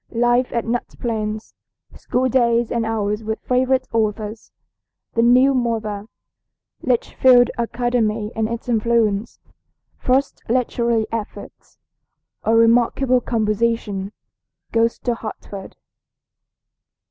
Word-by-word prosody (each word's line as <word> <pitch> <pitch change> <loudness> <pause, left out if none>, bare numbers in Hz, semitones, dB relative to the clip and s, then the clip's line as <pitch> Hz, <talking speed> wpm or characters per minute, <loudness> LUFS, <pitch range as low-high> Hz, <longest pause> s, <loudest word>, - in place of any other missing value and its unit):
LIFE 240 +1 +1
AT 235 - -1
NUT 235 +1 -3
PLAINS. 215 -2 -3 0.4
SCHOOL 255 +1 -1
DAYS 235 -2 +2
AND 230 -2 0
HOURS 210 -1 -1
WITH 220 +1 -2
FAVORITE 255 +1 +1
AUTHORS. 215 -1 -2 0.6
THE 230 - +2
NEW 250 +3 +5
MOTHER. 220 -4 -2 0.7
LITCHFIELD 250 0 +4
ACADEMY 230 -3 0
AND 220 0 0
ITS 235 +1 -5
INFLUENCE. 225 -2 +1 0.6
FIRST 265 +2 0
LITERARY 235 -2 +1
EFFORTS. 225 -2 -7 0.7
A 225 - +2
REMARKABLE 240 +3 +3
COMPOSITION. 215 -3 -1 0.6
GOES 230 0 +2
TO 245 - -1
HARTFORD. 210 -3 -8
230 Hz, 100 wpm, -21 LUFS, 220-245 Hz, 0.7 s, NEW